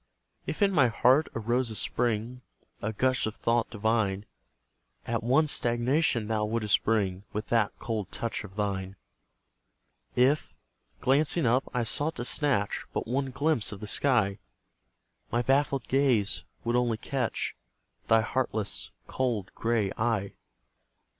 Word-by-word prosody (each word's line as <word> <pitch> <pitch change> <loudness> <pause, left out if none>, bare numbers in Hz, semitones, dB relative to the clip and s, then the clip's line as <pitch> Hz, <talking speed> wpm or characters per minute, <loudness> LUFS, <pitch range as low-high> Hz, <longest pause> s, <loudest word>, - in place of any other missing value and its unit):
If 155 - -1
in 200 - +4
my 145 -9 +4
heart 125 +6 +3
arose 120 +2 0
a 110 - -5
spring, 120 +2 -1 0.4
A 110 - -2
gush 130 +2 +1
of 110 - -5
thought 115 0 +1
divine, 110 -3 0 0.8
At 115 0 -1
once 140 +6 +3
stagnation 120 0 +1
thou 110 -1 0
wouldst 110 -1 +1
bring 100 -4 0
With 105 +1 -4
that 115 -3 +1
cold 110 -5 -4
touch 115 -1 -3
of 95 -3 -11
thine. 100 -2 -2 1.2
If, 130 +5 +2 0.5
glancing 145 +5 +2
up, 125 +3 +2
I 125 -2 0
sought 145 +7 +1
to 120 - -4
snatch 125 -9 0
But - - -2
one 135 +3 -1
glimpse 140 -2 +1
of 100 - -7
the 105 - -6
sky, 105 -4 +3 0.9
My 120 +2 +1
baffled 135 -1 +1
gaze 125 -7 +2 0.2
would 120 0 0
only 120 -2 +1
catch 125 -2 -2 0.5
Thy 115 0 +5
heartless, 110 -3 -2 0.2
cold 120 -7 -2
grey 115 -4 0
eye. 110 -4 0
115 Hz, 135 wpm, -28 LUFS, 105-130 Hz, 1.2 s, Thy